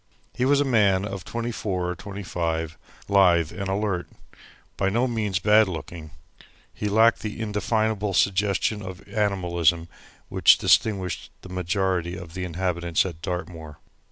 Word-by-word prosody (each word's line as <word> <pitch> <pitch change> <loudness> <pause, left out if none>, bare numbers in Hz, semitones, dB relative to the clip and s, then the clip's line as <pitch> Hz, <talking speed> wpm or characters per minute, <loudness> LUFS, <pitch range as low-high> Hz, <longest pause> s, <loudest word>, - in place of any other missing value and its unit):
He 125 - 0
was 140 +1 +4
a 145 - +2
man 100 -6 +3
of 100 -4 -6
twenty 115 +4 -4
four 95 -5 -2
or - - -5
twenty 100 +3 -8
five, 80 -2 -2 0.3
lithe 90 -5 +4
and 100 -2 -5
alert. 95 -2 -1 0.7
By 95 0 0
no 120 +6 +1
means 105 -6 -1
bad 105 +3 +4
looking, 80 -2 -7 0.6
he 105 - -3
lacked 110 +3 +4
that 105 - -3
indefinable 105 -1 -1
suggestion 100 +2 +1
of 95 -1 -9
animalism 85 -5 0 0.4
which - - +5
distinguished 95 -5 +1
the 95 - -10
majority 90 -1 -1
of 85 -2 -10
the 90 0 -4
inhabitants 85 -1 -1
at 85 -4 -7
Dartmoor. 85 -4 -6
95 Hz, 145 wpm, -24 LUFS, 85-105 Hz, 0.7 s, which